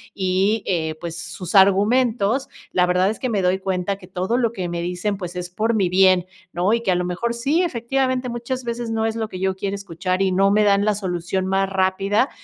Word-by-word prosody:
y, 195 +3 +1
eh, 160 -4 -1
pues, 170 -1 -6
sus 170 +2 -7
argumentos, 215 +5 +3 0.2
la 180 0 +2
verdad 180 +2 +2
es 220 - -7
que 255 - -2
me 205 -4 0
doy 180 +1 +2
cuenta 190 0 -2
que 180 - -13
todo 190 +5 -1
lo 235 -3 +1
que 185 -5 -3
me 170 0 -3
dicen, 180 +4 -2
pues, 180 -2 -6
es 180 0 -5
por 220 +5 0
mi 195 -4 +2
bien, 185 -1 +4 0.3
¿no? 180 +5 +1
Y 230 - +1
que 225 - -2
a - - +2
lo 180 0 -1
mejor 230 +7 -2
sí, 280 +9 +1
efectivamente 260 -3 -1
muchas 240 +2 -4
veces 235 0 -4
no 225 0 0
es 225 0 -1
lo 225 -1 -2
que 185 - -7
yo 190 0 0
quiero 195 +1 -3
escuchar 185 -1 -3
y 190 - +1
no 195 +2 +3
me 210 +1 +3
dan 200 -1 +3
la 210 0 +2
solución 185 -1 -2
más 195 0 +1
rápida, 195 +5 +1
195 Hz, 230 wpm, -21 LUFS, 185-225 Hz, 0.3 s, bien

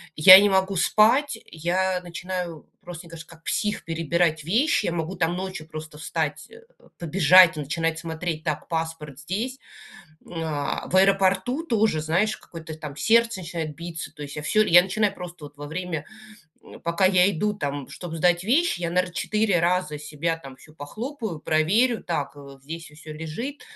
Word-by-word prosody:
я 185 +5 +11
не 205 - +3
могу 190 0 +1
спать. 225 - +3
Я 180 +3 -1
начинаю 175 -2 -6
просто, 175 0 -9
мне - - -16
кажется, 165 -1 -10
как 165 -1 -16
псих 210 +3 -2
перебирать 165 -1 0
вещи, 220 - +1
я - - 0
могу 170 +2 -3
там 170 0 0
ночью 185 -4 -6
просто 155 -1 -9
встать, 155 -1 -3
э, 460 +1 -14 0.4
побежать, 175 +1 +6
начинать 160 +3 -2
смотреть: 165 -1 -4
так, 155 -3 -3
паспорт 160 -4 -4
здесь. 215 - -4 0.7
Э, - - -16 0.6
в 185 - 0
аэропорту 195 +8 +2
тоже, 220 - +1
знаешь, 175 +8 0
какое-то 160 -2 -10
там 150 -3 -8
сердце 230 +2 +2
начинает 165 -3 -5
биться, 170 -3 -7
то 150 - -9
есть, 145 0 -8
я 150 - -4
всё. 215 +7 +3
Я 175 -3 +7
начинаю 195 +2 0
просто 175 -4 -9
вот 145 0 -16
во 145 - -7
время, 165 -1 -4 0.8
пока 170 +3 +1
я 185 0 +5
иду 210 +3 0
там, 145 -7 -4
чтоб 175 -2 -8
сдать 175 +1 +2
вещи, 280 - +2
я, 170 - -1
наверно, 180 0 0
4 205 +1 +1
раза 175 -3 0
себя 155 +2 -3
там 135 -5 -12
всю 155 - -18
похлопаю, 215 - -6
проверю: 205 +12 +2
так, 145 -5 -3 0.3
здесь 165 +3 -7
всё 155 0 -11
лежит. 195 - -6
170 Hz, 165 wpm, -24 LUFS, 155-195 Hz, 0.8 s, я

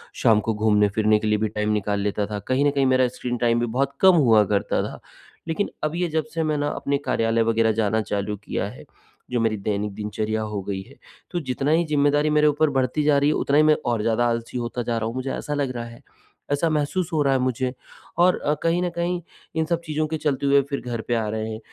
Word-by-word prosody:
शाम 110 -2 +4
को 110 - +2
घूमने-फिरने 105 0 +2
के 110 - -3
लिए 105 0 +2
भी 110 - +1
टाइम 105 0 -1
निकाल 105 -1 -1
लेता 105 0 -1
था, 105 -1 -4
कहीं 130 +7 0
न 145 - +4
कहीं 140 -1 +1
मेरा 130 -1 +3
स्क्रीन 125 0 -4
टाइम 120 0 +2
भी 120 - +1
बहुत 135 +4 -1
कम 190 -2 +7
हुआ 115 -8 +5
करता 100 0 0
था। - - -6 0.5
लेक़िन 165 +5 -1
अब 155 +2 -1
ये 175 0 0
जब 160 0 -1
से 165 -1 0
मैं 155 -1 0
ना 145 0 0
अपने 140 0 -1
कार्यालय 115 -2 +1
वग़ैरह 115 0 +2
जाना 110 0 +1
चालू 105 0 -2
किया - - -2
है, - - -12 0.5
जो 120 - +1
मेरी 110 -2 +1
दैनिक 100 0 -2
दिनचर्या 110 +1 -2
हो 105 -2 -3
गई 95 -1 -4
है, - - -15 0.4
तो 175 - -1
जितना 135 +1 -1
ही 165 +1 +3
ज़िम्मेदारी 145 0 +2
मेरे 150 0 +4
ऊपर 150 +1 +2
बढ़ती 135 +3 0
जा 145 -1 +4
रही 145 +1 +3
है - - +2
उतना 140 +1 +1
ही 155 - +6
मैं 155 0 +5
और 120 -3 0
ज़्यादा 115 +2 +1
आलसी 115 +1 -3
होता 120 0 -3
जा 115 -1 -1
रहा 110 - -2
हूँ 115 - -5
मुझे 130 +1 -3
ऐसा 150 - -4
लग 140 -3 -1
रहा 120 0 -4
है, 115 0 -12 0.5
ऐसा 150 +3 +1
महसूस 155 +4 -1
हो 155 - +2
रहा 135 -1 +2
है 130 - +2
मुझे 130 0 -1 0.5
और 180 +1 +5
अ, 150 - 0
कहीं 170 +2 +2
न 175 - 0
कहीं 175 +1 -1 0.3
इन 160 0 +1
सब 170 +1 -1
चीज़ों 155 0 -1
के 160 +1 -3
चलते 140 -2 -1
हुए 140 0 +5
फ़िर 140 - -2
घर 120 -2 -4
पे 120 - +1
आ 110 -2 -1
रहे 110 +1 -3
हैं 110 - -6
125 Hz, 250 wpm, -23 LUFS, 110-150 Hz, 0.5 s, कम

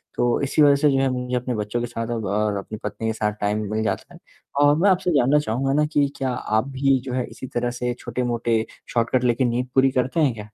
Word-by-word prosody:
तो 120 -1 +1
इसी 140 +2 +1
वजह 145 -1 +7
से 145 +1 +3
जो 135 - +2
है 135 -1 +2
मुझे 125 0 -3
अपने 125 0 -2
बच्चों 105 +3 -2
के 120 - -2
साथ 115 -1 -4 0.2
और 105 +1 0
अपनी 105 +2 -6
पत्नी 115 - -4
के 110 - 0
साथ 105 -1 -1
टाइम 105 +1 0
मिल 110 0 0
जाता - - -3
है - - -14 0.4
और 145 0 +5
मैं 195 +4 +4
आपसे 180 -1 +2
जानना 140 +3 +4
चाहूँगा 135 0 -1
ना 150 +1 +3
कि 145 -1 +3
क्या 135 -1 -1
आप 110 0 -1
भी 135 0 +2
जो 130 - -4
है 125 -1 -1
इसी 130 - -8
तरह 120 0 -2
से 125 0 -2
छोटे-मोटे 120 -2 -1 0.3
शॉर्टकट 120 +2 +1
लेके 125 +1 +2
नींद 120 +1 -1
पूरी 135 0 +5
करते 130 +5 0
हैं 145 -6 +3
क्या? 115 - -11
125 Hz, 245 wpm, -23 LUFS, 115-135 Hz, 0.4 s, वजह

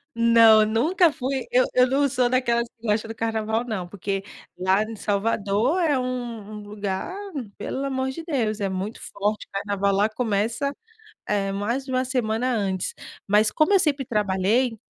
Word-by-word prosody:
Não, 230 -2 +6
nunca 305 - +3
fui 265 -1 -3
eu 255 +1 +4
eu 250 0 +5
não 280 +2 +2
sou 250 -2 +1
daquelas 235 -2 +1
que 230 -1 -11
gosta 215 +1 +1
do 225 - -7
carnaval 225 +1 -1
não, 195 -7 -4
porque 195 +1 -4 0.3
lá 190 +3 +2
em 225 +1 -7
Salvador 210 - 0
é 295 -5 +2
um 240 -4 -4
um - - -7
lugar, 205 - -4 0.4
pelo 265 +6 -4
amor 265 -1 -1
de 325 +4 -7
Deus, 235 -9 -1
é 195 - 0
muito 190 +4 -4
forte. 205 +1 -3
Carnaval 200 0 0
lá 205 +2 +3
começa, 225 +4 -1 0.6
eh, 195 -1 0
mais 235 +7 -2
de 260 - -7
1 255 0 +1
semana 250 -1 0
antes. 195 - -1 0.3
Mas 210 +2 +4
como 310 +6 +2
eu 390 - +6
sempre 285 -4 +1
trabalhei, 215 +3 +1
225 Hz, 170 wpm, -24 LUFS, 205-255 Hz, 0.6 s, Não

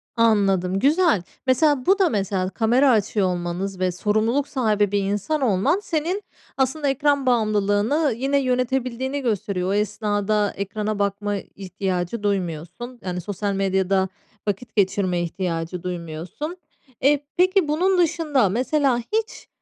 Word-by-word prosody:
Anladım. 195 -5 +2
Güzel. 300 - +3 0.2
Mesela, 260 0 +3
bu 395 +2 +4
da 375 -3 +4
mesela 195 -3 -1
kamera 235 +7 +3
açıyor 210 -3 +2
olmanız 180 +2 -3
ve 185 -1 +1
sorumluluk 220 +9 0
sahibi 210 -6 +1
bir 205 - +2
insan 205 +10 -1
olman 260 - +2
senin 345 +5 -2 0.3
aslında 275 +2 +1
ekran 285 0 +1
bağımlılığını 215 +4 +2
yine 270 +3 +1
yönetebildiğini 255 +1 -1
gösteriyor. 200 -6 -1
O - - +1
esnada 210 0 0
ekrana 210 +1 -3
bakma 205 +1 -1
ihtiyacı 190 +1 -4
duymuyorsun. 195 +5 -3
Yani, 180 -1 -3
sosyal 200 +2 -3
medyada 190 0 +1 0.4
vakit 210 +3 -3
geçirme 190 -3 +1
ihtiyacı 170 0 -3
duymuyorsun. 180 - -5 0.4
Eee, 285 +2 +3
peki 370 -1 +3
bunun 365 +6 +2
dışında 315 - +2
mesela 255 +4 +1
hiç 440 - -3
210 Hz, 125 wpm, -23 LUFS, 190-275 Hz, 0.4 s, bu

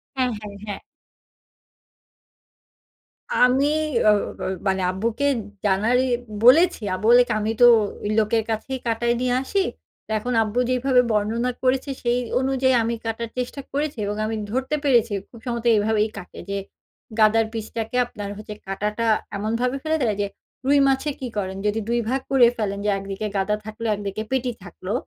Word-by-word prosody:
হ্যাঁ, 255 -1 +1
হ্যাঁ, 205 -1 -9
হ্যাঁ। 205 - -4 2.5
আমি 255 +3 +4 0.4
ও - - +8 0.3
ব - - -9 0.3
মানে 190 0 +1
আব্বুকে 230 +8 -1 0.4
জানারই 220 +6 +3 0.4
বলেছি। 325 +5 +6
আব্বু 215 +4 -2
বলেকি, 245 0 +6
"আমি 215 +1 -1
তো - - +10 0.4
ঐ - - -2
লোকের 220 +1 +2
কাছেই 250 +4 -3
কাটায় 235 +1 +1
নিয়ে 250 -1 +1
আসি।" 395 +9 -1 0.5
ত - - -76
এখন 245 +3 -3
আব্বু 215 +3 -2
যেইভাবে 255 0 +3
বর্ণনা 225 +4 0
করেছে, 260 +2 +1
সেই 240 0 +2 0.2
অনুযায়ী 260 0 +2
আমি 235 +1 -1
কাটার 225 0 -3
চেষ্টা 250 +3 -3
করেছি 290 -1 -2
এবং 205 +1 -2
আমি 225 +1 -2 0.2
ধরতে 260 +4 -1
পেরেছি 235 -5 +3 0.2
খুব 235 - -13
সম্ভবত 235 -1 -3
এভাবেই 215 +1 +1
কাটে 180 -2 -9
যে 200 - -1 0.6
গাদার 220 +1 +5
পিসটাকে 225 +1 -4
আপনার 205 -4 -7 0.4
কাটাটা 210 +4 -2 0.3
এমনভাবে 230 +5 -1
ফেলে 315 0 +1
দেয় 220 -5 +1
যে 200 - 0 0.4
রুই 285 +2 +4
মাছে 270 +2 +1
কি 260 - -4
করেন? 190 -1 -2
যদি 210 +1 +1
২ 240 0 +2
ভাগ 265 +1 0
করে 265 -3 +6
ফেলেন 200 -2 -2
যে - - +2
একদিকে 195 +2 -4
গাদা 195 +2 +1
থাকলে, 220 +1 -5
একদিকে 200 +1 -4
পেটি 255 -1 0
থাকলো। 185 +2 -6
230 Hz, 155 wpm, -23 LUFS, 210-255 Hz, 2.5 s, তো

